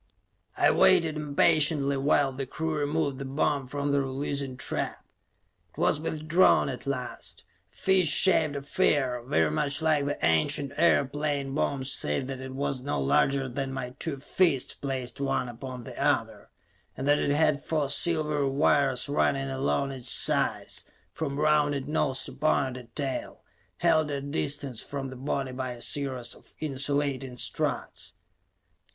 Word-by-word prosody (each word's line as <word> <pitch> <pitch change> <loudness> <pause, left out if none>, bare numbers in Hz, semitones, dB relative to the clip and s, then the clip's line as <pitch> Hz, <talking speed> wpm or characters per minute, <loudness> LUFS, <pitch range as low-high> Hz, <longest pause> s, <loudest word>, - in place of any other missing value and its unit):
I - - +4
waited 160 -2 +4
impatiently 145 -1 +2
while 140 0 +2
the 135 0 -5
crew 160 +4 -3
removed 145 -2 -1
the 140 - -5
bomb 140 0 0
from 145 +2 -2
the 140 0 +2
releasing 135 0 -3
trap. - - -4 0.6
It - - -28
was 150 - +2
withdrawn 155 0 +3
at 130 0 -7
last; 130 -2 -5 0.3
a - - -30
fish 190 -2 +2
shaped 155 -2 +5
affair, 140 -3 0
very 80 - +1
much 145 - -1
like 155 -3 +1
the 145 - -2
ancient 80 - +1
airplane 145 -3 +1
bombs 135 -2 -1
save 75 - -1
that 130 0 -5
it 130 0 -7
was 140 -1 -2
no 140 - -2
larger 135 - +2
than 135 +1 -4
my 130 -2 -5
two 155 -4 -3
fists, 145 0 +1
placed 135 -1 -5
one 135 -2 0
upon 125 +1 -8
the - - -9
other, - - 0 0.5
and 135 - -3
that 145 0 +4
it - - 0
had 145 -1 +2
four 155 -3 0
silvery 150 -1 +2
wires 140 -2 +2
running 135 -1 0
along 135 +1 0
its 130 -3 -6
sides, - - +1 0.3
from 140 0 -4
rounded 150 -2 +2
nose 145 -3 0
to - - -7
pointed 130 -4 -1
tail, 135 -3 -4 0.3
held 160 -3 +2
at 145 - -2
a - - -5
distance 140 -4 -1
from 135 -1 -5
the 130 - -9
body 135 0 -3
by 130 -1 -4
a 120 - -12
series 130 -2 -2
of - - -18
insulating 140 -2 -2
struts. - - -3
140 Hz, 155 wpm, -27 LUFS, 130-150 Hz, 0.6 s, shaped